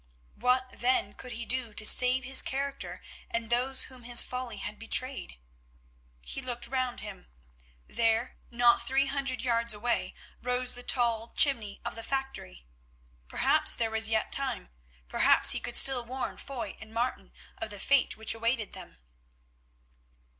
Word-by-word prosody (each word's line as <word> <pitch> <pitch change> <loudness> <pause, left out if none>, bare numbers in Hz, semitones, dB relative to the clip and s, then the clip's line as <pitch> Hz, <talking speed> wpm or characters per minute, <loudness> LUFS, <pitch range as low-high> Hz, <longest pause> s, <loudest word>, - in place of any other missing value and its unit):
What, 255 +2 0
then, 240 -5 0
could 250 -1 -8
he 235 +1 -6
do 245 -4 -2
to 215 - -1
save 255 +3 +5
his 260 +1 +6
character 275 +1 -5 0.3
and 230 0 -3
those 260 +2 +2
whom 255 -1 -9
his 240 0 +6
folly 250 -4 -6
had 210 +1 -7
betrayed? 255 - -2 0.8
He 270 - -5
looked 245 -2 -4
round 255 -2 -3
him; - - -10 0.6
there, 230 +1 -1
not 240 0 +3
three 265 +3 0
hundred 275 -2 -3
yards 235 -2 +2
away, 235 +3 -2 0.3
rose 250 0 0
the 245 - -8
tall 235 -3 +1
chimney 230 -9 +2
of - - -4
the 230 - -8
factory. 270 - -6 0.6
Perhaps - - +4
there 225 -1 -2
was 220 -1 +2
yet 220 -1 -1
time; 270 - 0 0.4
perhaps - - +5
he - - 0
could - - -6
still 265 -3 +5
warn 255 +2 -5
Foy 270 -4 -7
and 220 0 -11
Martin 235 +3 -3 0.3
of 225 - -5
the 205 - -7
fate 275 +5 +1
which 220 - -1
awaited 230 -1 -2
them. - - -11
245 Hz, 155 wpm, -28 LUFS, 225-260 Hz, 0.8 s, his